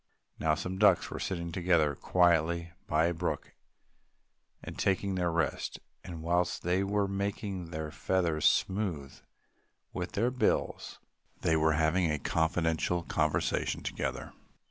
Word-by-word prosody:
Now 80 -1 +2
some 95 +4 -4
ducks 105 - +4
were - - -5
sitting 85 -3 -3
together 85 -4 +2
quietly 85 +1 +2 0.2
by 80 +2 +3
a 85 - +1
brook 85 +1 -3 1.1
and - - -7
taking 95 0 0
their 90 -2 0
rest; 80 -1 -1 0.2
and, 85 -3 -8
whilst 90 0 0
they 90 +3 +1
were 100 0 +1
making 100 -1 -3
their 80 -2 -5
feathers 85 -1 0
smooth 90 -9 0 0.8
with 90 0 -4
their 115 +5 +1
bills, 125 - -1 0.4
they 80 - +2
were 80 0 +3
having 80 +3 +2
a 75 - 0
confidential 80 +2 0
conversation 75 -2 0
together. - - -4
85 Hz, 130 wpm, -30 LUFS, 80-95 Hz, 1.1 s, ducks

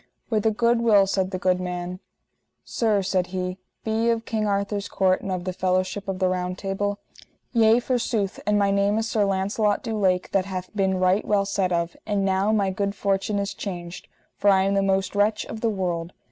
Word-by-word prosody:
With 215 -1 +2
a - - +6
good 235 +2 +2
will, 210 -4 +5
said 190 -1 0
the 185 - -3
good 185 0 +1
man. 180 0 -4 0.6
Sir, 215 -4 0
said 185 -1 0
he, 185 0 -4 0.2
be 220 - -2
ye - - +3
of 230 -1 0
King 215 -2 -1
Arthur's 200 0 -1
court 185 -1 +2
and 195 - -4
of 180 -1 -2
the 185 0 -3
fellowship 185 +2 -1
of 190 -1 -2
the 185 0 +1
Round 180 0 -2
Table? 205 +1 -2 0.6
Yea 225 0 +5
forsooth, 235 -5 -1
and 210 0 +3
my 200 -1 +2
name 200 +1 +2
is 225 0 0
Sir 215 -2 +1
Launcelot 200 +2 0
du 225 - -3
Lake 185 -3 +1
that 190 -2 +1
hath 185 0 -6
been 190 -2 +1
right 185 +3 +3
well 200 -1 +1
said 195 -2 0
of, 170 0 -1
and 200 -2 0
now 195 +2 +2
my 200 -3 +2
good 200 +1 -2
fortune 200 +1 0
is 200 0 -2
changed, 175 -2 -7 0.3
for 205 - +2
I 190 -1 +5
am 195 +1 +1
the 200 - +2
most 195 -1 0
wretch 210 +1 +1
of 220 - -7
the 230 - +2
world. 180 -4 -2
195 Hz, 215 wpm, -24 LUFS, 185-210 Hz, 0.6 s, a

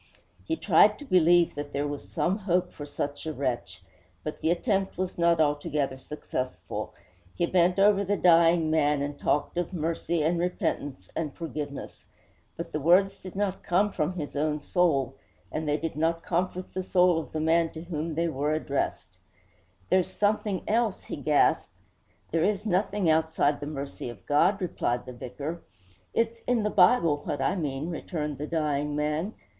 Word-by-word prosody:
He 325 - 0
tried 210 - +5
to 290 - -10
believe 175 - +4
that 145 0 -6
there 145 +1 -1
was 145 0 -6
some 180 - 0
hope 180 -2 0
for 145 - -8
such 145 +1 -4
a 155 - -2
wretch; 120 -10 -3 0.4
but 155 - -5
the 160 - +1
attempt 195 +2 0
was 185 0 -2
not 170 -1 +3
altogether 145 -2 0
successful. 130 -2 -5 0.4
He 175 - +1
bent 180 +1 +3
over 200 0 +5
the 200 +1 0
dying 165 -2 +5
man 150 -2 +2
and 145 0 -5
talked 150 +4 0
of 175 +1 -3
mercy 165 -1 -1
and 170 +2 +1
repentance 145 - -2
and 155 -4 -3
forgiveness. 150 -4 -6 0.5
But 170 0 -6
the 155 - -2
words 180 +6 +4
did 185 -1 -10
not 195 -1 -1
come 200 +4 +2
from 165 -1 -1
his 150 -5 -6
own 150 +1 0
soul, 140 -6 +1 0.3
and 155 0 -3
they 150 0 +2
did 160 +2 -4
not 165 +2 0
comfort 180 +1 -2
the 185 - -2
soul 180 -2 +3
of 160 - -8
the 155 - -3
man 165 +1 +3
to 160 - -7
whom 160 -2 -4
they 170 +1 +1
were 150 -1 -1
addressed. 150 -2 -3 0.7
'There's 185 -1 +3
something 205 -2 0
else!' 225 -2 +1
he - - -6
gasped. 145 +1 +2 0.6
'There 165 0 +2
is 205 +2 0
nothing 195 -1 +1
outside 160 -2 +2
the 145 - -5
mercy 140 -4 -5
of 115 -5 -11
God,' 175 +8 +3
replied 125 -8 -1
the 125 - -8
vicar. 140 +7 -6 0.5
'It's 230 0 0
in 245 -3 +2
the 210 - 0
Bible, 165 -12 +5
what 145 - -3
I 180 - +1
mean,' 150 -1 -3
returned 150 -4 -4
the 150 - -3
dying 150 -2 -1
man. 150 +7 -1
165 Hz, 175 wpm, -27 LUFS, 145-180 Hz, 0.7 s, tried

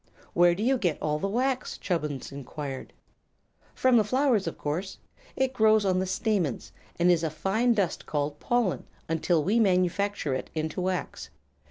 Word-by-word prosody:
"Where 175 0 +5
do 205 - -3
you 260 +2 +2
get 175 -8 0
all 150 0 -1
the 195 - -1
wax?" 255 +5 -1
Chubbins 150 -8 -3
enquired. 140 0 -6 0.8
"From 255 -2 +4
the 220 - +5
flowers, 250 -3 +1
of 165 - -4
course. 170 +7 -3 0.4
It 265 0 0
grows 220 -3 +4
on 185 -1 +2
the 185 - -1
stamens, 185 - -1 0.3
and 175 +1 +4
is 170 -2 +2
a 160 - +1
fine 195 +10 +1
dust 195 -5 -1
called 145 0 -2
pollen, 240 -6 0 0.2
until 165 0 +1
we 210 +8 +2
manufacture 185 -4 +1
it 130 - -4
into 160 +3 -2
wax. 185 -3 -3
185 Hz, 165 wpm, -27 LUFS, 155-220 Hz, 0.8 s, Where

